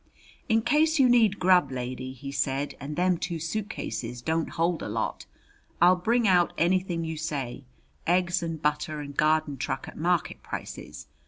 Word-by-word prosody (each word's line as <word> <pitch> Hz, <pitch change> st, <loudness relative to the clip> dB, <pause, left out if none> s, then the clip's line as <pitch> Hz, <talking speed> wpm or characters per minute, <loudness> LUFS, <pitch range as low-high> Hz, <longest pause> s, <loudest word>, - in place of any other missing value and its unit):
"In 225 Hz, 0 st, +3 dB
case 305 Hz, +6 st, +3 dB
you 265 Hz, -3 st, +6 dB
need 225 Hz, -5 st, +4 dB
grub, 180 Hz, -6 st, +4 dB
lady," 130 Hz, 0 st, -4 dB
he 135 Hz, +1 st, -8 dB
said," 140 Hz, 0 st, -1 dB
and 145 Hz, +2 st, -6 dB
them 180 Hz, 0 st, +2 dB
two 170 Hz, +1 st, -3 dB
suitcases 160 Hz, -, -4 dB
don't 160 Hz, 0 st, 0 dB
hold 170 Hz, 0 st, 0 dB
a -, -, -4 dB
lot, -, -, -3 dB, 0.5 s
I'll 180 Hz, +2 st, +6 dB
bring 225 Hz, +5 st, +1 dB
out 180 Hz, -2 st, +4 dB
anything 175 Hz, -1 st, +1 dB
you 160 Hz, 0 st, -4 dB
say: 140 Hz, -4 st, -4 dB, 0.4 s
eggs 175 Hz, +1 st, +2 dB
and 165 Hz, -2 st, -3 dB
butter 150 Hz, 0 st, -1 dB
and 145 Hz, -1 st, -7 dB
garden 155 Hz, -2 st, +2 dB
truck -, -, -3 dB
at -, -, -10 dB
market -, -, 0 dB
prices. -, -, -7 dB
165 Hz, 165 wpm, -27 LUFS, 145-185 Hz, 0.5 s, you